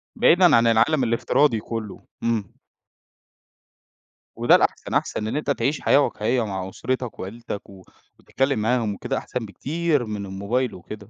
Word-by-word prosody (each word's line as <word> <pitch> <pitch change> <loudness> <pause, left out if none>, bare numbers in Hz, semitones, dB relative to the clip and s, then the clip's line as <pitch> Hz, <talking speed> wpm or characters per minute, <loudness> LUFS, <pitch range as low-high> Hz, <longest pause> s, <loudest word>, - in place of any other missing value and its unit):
بعيدًا 175 0 +5
عن 115 0 +4
العالم 120 +5 +3
الافتراضي 120 +1 +2
كله. 110 -2 -6 0.2
إمم. 115 -5 -1 1.8
وده - - +5
الأحسن، - - 0
أحسن 105 - -1
إن 110 - -3
أنت 150 - -3
تعيش 140 +1 -1
حياة 145 - +4
واقعية 120 -3 0
مع 95 -2 -4
أسرتك 130 +4 -4
وعيلتك 105 +1 -7
و 95 -2 -14 0.4
وتتكلم 135 -3 -1
معاهم 115 -1 +1
وكده 125 +6 -3
أحسن 125 -3 -4
بكتير 145 +5 -1
من 105 -2 -5
الموبايل 100 +6 -2
وكده. 105 +3 -10
115 Hz, 140 wpm, -23 LUFS, 105-130 Hz, 1.8 s, بعيدًا